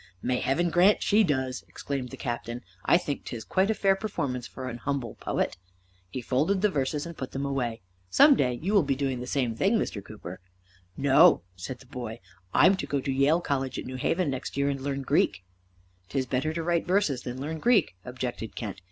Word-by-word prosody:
"May 125 +5 0
Heaven 170 +6 +1
grant 185 +5 +5
she 215 +1 +4
does!" 130 -6 -1
exclaimed 135 -3 -4
the - - -9
Captain. 120 0 -4 0.2
"I - - +6
think 145 -5 -4
'tis 115 -3 -6
quite 190 +2 +1
a 220 - +2
fair 195 -2 +3
performance 140 - -3
for 130 -1 -7
an 120 -1 -5
humble 135 -3 -2
poet." - - -2 0.5
He 125 - -5
folded 160 - +1
the 210 - +4
verses 145 0 -1
and 170 0 -7
put 130 - -6
them 135 +1 -2
away. 125 -5 -2 0.3
"Some 285 - +7
day 125 - +1
you 195 +4 0
will 200 - +6
be 140 -3 0
doing 135 -2 -1
the 125 - -6
same 125 -4 0
thing, 200 - +2
Mr. 100 - -3
Cooper." 95 -4 -9 0.6
"No," 140 - +6
said 95 +8 -6
the - - -15
boy. 120 -3 -6 0.3
"I'm 190 - +6
to - - -4
go 140 - 0
to 135 +1 -2
Yale 140 +6 +3
College 135 -5 -2
at - - -5
New 130 - -6
Haven 165 +4 0
next 130 +1 -5
year 140 0 +2
and 135 -1 -2
learn 140 0 -2
Greek." 95 -7 +1 0.7
"'Tis 130 +4 -1
better 130 +5 -1
to 165 +1 -3
write 170 0 0
verses 175 -9 +2
than 125 +1 -6
learn 155 +4 -4
Greek," 210 - +3
objected 125 -4 -5
Kent. 105 -4 -5
135 Hz, 210 wpm, -27 LUFS, 125-165 Hz, 0.7 s, Some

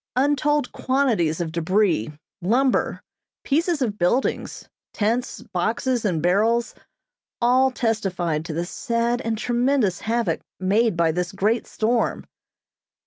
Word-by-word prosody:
Untold 290 +1 +1
quantities 230 - +1
of 170 -2 -2
debris, 170 - +1 0.3
lumber, 245 +8 +1 0.4
pieces 320 0 +1
of 210 -4 -3
buildings, 180 +10 0 0.3
tents, 230 +4 -1
boxes, 225 +6 0
and 170 -6 0
barrels, 225 +7 +2 0.7
all 255 +2 +4
testified 190 -10 -1
to 165 - -5
the 170 +2 -2
sad 235 +5 -1
and 225 -2 -2
tremendous 240 -4 +1
havoc 225 -7 -1 0.2
made 205 +2 +2
by 165 -1 +3
this 175 +1 -2
great 215 +4 0
storm. 230 +2 0
225 Hz, 115 wpm, -23 LUFS, 180-250 Hz, 0.7 s, all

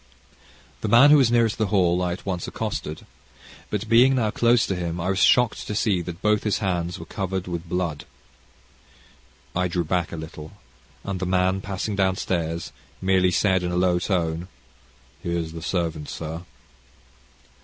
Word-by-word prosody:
The - - -2
man 120 +7 +7
who 150 - +8
was 130 -5 +4
nearest 115 -2 +2
the 110 - +2
hall, 90 -3 +2
I 90 -1 0
at 90 - -9
once 90 -3 -3
accosted, 75 +1 -4 0.6
but 105 +1 -3
being 125 +4 +5
now 110 -4 +1
close 120 +1 +3
to 95 - -2
him, 85 -1 -3
I 90 +2 -1
was 95 - -1
shocked 125 -2 +3
to 105 - -3
see 100 -4 +1
that 85 +1 -8
both 105 -1 +3
his 105 -3 +1
hands 90 -4 -2
were 80 - -9
covered 95 +2 -3
with 85 -1 -5
blood. 85 -4 -2 1.5
I 90 0 +1
drew 85 0 -1
back 85 +1 -1
a - - -5
little, 80 0 -9 0.5
and 100 -2 -4
the 95 - -2
man, 95 +1 +1
passing 100 +2 -3
downstairs, 90 -4 -1 0.3
merely 95 -1 +3
said 95 0 +2
in 90 0 -2
a 90 - -1
low 90 -1 +2
tone, 85 -2 -1 0.7
"Here's 85 -2 -2
the 80 0 -8
servant, 80 -4 -2
sir." 80 +2 -6
90 Hz, 170 wpm, -24 LUFS, 85-100 Hz, 1.5 s, who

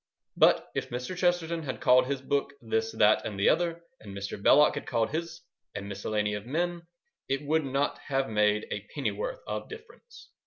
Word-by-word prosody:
But - - +4
if - - -3
Mr. 125 +9 -4
Chesterton 175 -2 +1
had 140 -4 -5
called 125 0 +5
his 135 -1 -3
book 140 0 -1
This, 110 -2 -1
That, 105 0 +4
and 100 -3 -5
the 100 - +4
Other 170 0 0 0.2
and 100 -1 -9
Mr. 100 0 -5
Belloc 150 +7 +6
had 145 - -6
called 115 -1 0
his 170 +2 -4 0.3
A 100 - -4
Miscellany 105 +1 -2
of 105 +2 -5
Men, 170 +4 -2 0.4
it 135 +2 -1
would 155 +1 +1
not 135 +2 -1
have 135 -1 0
made 105 -1 +2
a 105 0 -5
pennyworth - - -3
of - - -5
difference. 460 +2 -13
135 Hz, 185 wpm, -28 LUFS, 110-170 Hz, 0.4 s, Belloc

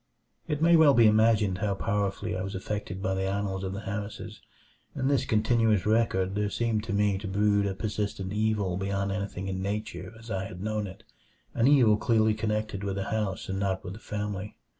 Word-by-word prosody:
3 150 - 0
It 150 - -7
may 170 +1 +6
well 155 -4 +6
be 115 - +6
imagined 110 -3 +4
how 100 -1 0
powerfully 100 -1 -1
I 95 - -3
was 95 +1 -4
affected 95 -1 -4
by 95 - 0
the 95 0 -1
annals 100 -1 -2
of 95 0 -3
the 100 - -5
Harrises. 105 0 -6 0.5
In 130 - 0
this 135 -2 +2
continuous 110 -2 +2
record 105 -4 +2
there 105 0 0
seemed 115 -1 -1
to 110 - -4
me 100 -1 +2
to 100 - -6
brood 100 +1 +2
a 95 - -3
persistent 100 -2 -3
evil 105 -4 0
beyond 100 0 -1
anything 100 -1 -4
in 95 -1 -3
nature 105 +3 -4
as 115 0 -11
I 95 -1 -2
had 90 -2 -8
known 105 -1 -1
it; 95 - -11 0.5
an 120 +1 +2
evil 125 -7 +5
clearly 110 -1 +3
connected 105 -2 -2
with 100 -1 -2
the 100 - -3
house 105 -4 -2
and 95 0 -3
not 95 -1 -1
with 95 -1 -6
the 105 - -10
family. 105 -1 -5
105 Hz, 205 wpm, -28 LUFS, 95-110 Hz, 0.5 s, may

